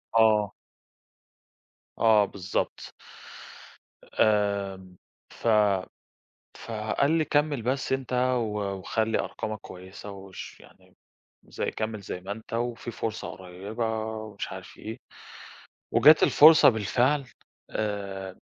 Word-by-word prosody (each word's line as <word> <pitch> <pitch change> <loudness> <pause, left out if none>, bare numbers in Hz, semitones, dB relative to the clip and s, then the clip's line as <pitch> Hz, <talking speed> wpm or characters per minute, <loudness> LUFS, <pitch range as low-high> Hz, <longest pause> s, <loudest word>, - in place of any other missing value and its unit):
آه. 110 -3 +4 1.4
آه، 110 -2 +5
بالضبط. 95 -1 -4 1.1
آآ، 100 -2 +1 0.5
ف - - -6 1.1
فقال 140 +2 -1
لي 160 -1 +2
كمل 145 -3 +1
بس 130 +4 -2
أنت، 130 -1 -3 0.2
و 105 -3 -2 0.2
وخلي 110 +4 0
أرقامك 110 0 -4
كويسة، 95 +2 -10
وش 95 -1 -10
يعني - - -20 0.5
زيّ - - -4
كمل 110 -1 -4
زيّ 90 -2 -6
ما 95 +2 -7
أنت، 110 +2 -8
وفي 120 0 -3
فرصة 110 -1 -4
قريبة، 105 +5 -4
ومش 110 -1 -6
عارف - - -10
إيه، - - -7 0.9
وجات 155 +1 +7
الفرصة 155 +2 +8
بالفعل، 125 +6 +1 0.5
آآ 100 -3 -4
110 Hz, 100 wpm, -27 LUFS, 100-120 Hz, 1.4 s, الفرصة